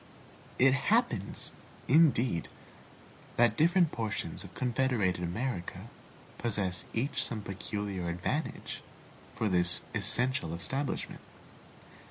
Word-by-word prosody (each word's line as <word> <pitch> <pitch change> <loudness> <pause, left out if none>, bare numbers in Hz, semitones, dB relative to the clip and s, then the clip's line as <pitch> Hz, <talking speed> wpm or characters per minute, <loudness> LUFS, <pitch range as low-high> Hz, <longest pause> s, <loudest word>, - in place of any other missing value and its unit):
It 130 +1 +6
happens, 135 - +2 0.4
indeed, 130 - +4 0.9
that 120 -2 +4
different 170 +2 +4
portions 110 -2 -3
of - - -12
confederated 120 -8 +1
America 90 +1 -3 0.5
possess 100 -6 0
each 135 +5 0
some 110 -2 -3
peculiar 100 -2 -4
advantage 90 - -3 0.5
for 110 - 0
this 90 -2 +2
essential 120 -10 +1
establishment. 135 +11 -3
115 Hz, 90 wpm, -31 LUFS, 90-130 Hz, 0.9 s, It